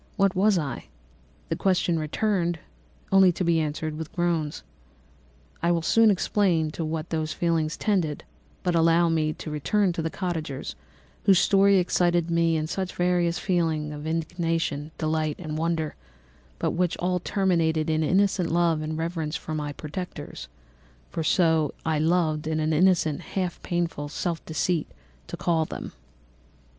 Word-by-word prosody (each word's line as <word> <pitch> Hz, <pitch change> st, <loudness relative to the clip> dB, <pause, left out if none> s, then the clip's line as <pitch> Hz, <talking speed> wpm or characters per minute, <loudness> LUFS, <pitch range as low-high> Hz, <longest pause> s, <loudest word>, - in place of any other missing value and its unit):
What 195 Hz, -2 st, +3 dB
was 200 Hz, +1 st, +4 dB
I? 140 Hz, -7 st, -3 dB, 0.6 s
The -, -, 0 dB
question 180 Hz, -3 st, +1 dB
again 175 Hz, +1 st, 0 dB, 0.5 s
recurred, 190 Hz, -2 st, +6 dB
to -, -, -1 dB
be 170 Hz, -1 st, +3 dB
answered 155 Hz, 0 st, -2 dB
only -, -, -7 dB
with 160 Hz, -1 st, -6 dB
groans. 170 Hz, -4 st, -1 dB, 1.0 s
"I 170 Hz, -, +2 dB
will 170 Hz, -1 st, +1 dB
soon 225 Hz, +6 st, +5 dB
explain 180 Hz, -5 st, +2 dB
to 165 Hz, -, -4 dB
what 160 Hz, +1 st, -4 dB
these 155 Hz, -1 st, -1 dB
feelings 165 Hz, -2 st, 0 dB
tended, 180 Hz, -9 st, 0 dB, 0.4 s
but 180 Hz, -, +1 dB
allow 165 Hz, +1 st, +4 dB
me 160 Hz, -1 st, +1 dB
now 155 Hz, -, -2 dB
to 155 Hz, -, -6 dB
return 180 Hz, +6 st, +1 dB
to 165 Hz, -, -3 dB
the 160 Hz, -, -1 dB
cottagers, 160 Hz, -7 st, -4 dB, 0.5 s
whose 195 Hz, -2 st, +6 dB
story 195 Hz, +1 st, +5 dB
excited 175 Hz, -1 st, +2 dB
in -, -, -1 dB
me 165 Hz, -2 st, +2 dB
such 185 Hz, +3 st, -4 dB
various 175 Hz, -1 st, +1 dB
feelings 160 Hz, -5 st, 0 dB
of 150 Hz, +1 st, -6 dB
indignation, 165 Hz, -2 st, -1 dB
delight, 155 Hz, -1 st, 0 dB
and 155 Hz, -4 st, -5 dB
wonder, 160 Hz, -1 st, -1 dB, 0.6 s
but -, -, 0 dB
which 175 Hz, 0 st, 0 dB
all 180 Hz, 0 st, 0 dB
terminated 165 Hz, -6 st, +1 dB
in 155 Hz, 0 st, +1 dB
additional 185 Hz, +1 st, +2 dB
love 170 Hz, -2 st, +2 dB
and 155 Hz, 0 st, -3 dB
reverence 165 Hz, -1 st, -2 dB
for 160 Hz, -, -5 dB
my 150 Hz, -1 st, -3 dB
protectors 150 Hz, -, -7 dB, 0.6 s
(for 165 Hz, -, -2 dB
so 160 Hz, -3 st, +2 dB
I 160 Hz, -1 st, +1 dB
loved, 155 Hz, -2 st, +1 dB
in 160 Hz, 0 st, 0 dB
an 155 Hz, +1 st, +1 dB
innocent, 165 Hz, -3 st, +3 dB
half 185 Hz, -2 st, -3 dB
painful 170 Hz, -4 st, -2 dB
self 165 Hz, +2 st, -3 dB
deceit, 160 Hz, 0 st, 0 dB, 0.4 s
to -, -, -6 dB
call 165 Hz, -2 st, +1 dB
them)." -, -, -7 dB
165 Hz, 155 wpm, -26 LUFS, 155-180 Hz, 1.0 s, recurred